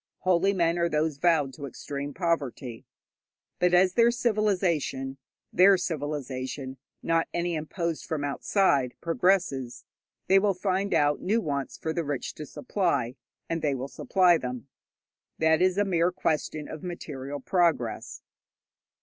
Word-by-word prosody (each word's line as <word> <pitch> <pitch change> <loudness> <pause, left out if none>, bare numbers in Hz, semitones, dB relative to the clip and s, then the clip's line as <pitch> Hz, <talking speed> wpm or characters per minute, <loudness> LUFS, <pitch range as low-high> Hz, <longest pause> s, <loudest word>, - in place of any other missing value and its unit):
Holy 185 +1 +3
men 170 -3 +1
are 170 0 +2
those 155 -1 0
vowed 150 -4 +2
to 140 +3 -7
extreme 140 +2 -6
poverty. 140 -8 -2 0.7
But 180 0 +4
as 185 +1 +4
their 235 +2 +5
civilization 190 - 0 0.4
(their 190 +2 +6
civilization, 140 -5 -4 0.3
not 165 0 +1
any 175 0 0
imposed 165 +1 -3
from 155 -3 -2
outside) 140 - +1
progresses, 165 -8 0 0.4
they 195 +1 +5
will 200 -1 +1
find 195 +1 -1
out 145 -2 +2
new 215 +5 +1
wants 140 - -3
for 160 - -3
the 170 - -1
rich 145 -3 -3
to 150 - -8
supply, 170 - -1 0.3
and 165 -1 -2
they 145 -3 +1
will 130 +1 -4
supply 180 +3 +3
them. 125 +1 -5 0.7
That 160 +1 +3
is 185 0 +3
a 205 - +3
mere 175 -2 +2
question 155 -3 -2
of 155 - -8
material 145 -6 -6
progress. 165 -7 0
165 Hz, 140 wpm, -27 LUFS, 140-180 Hz, 0.7 s, their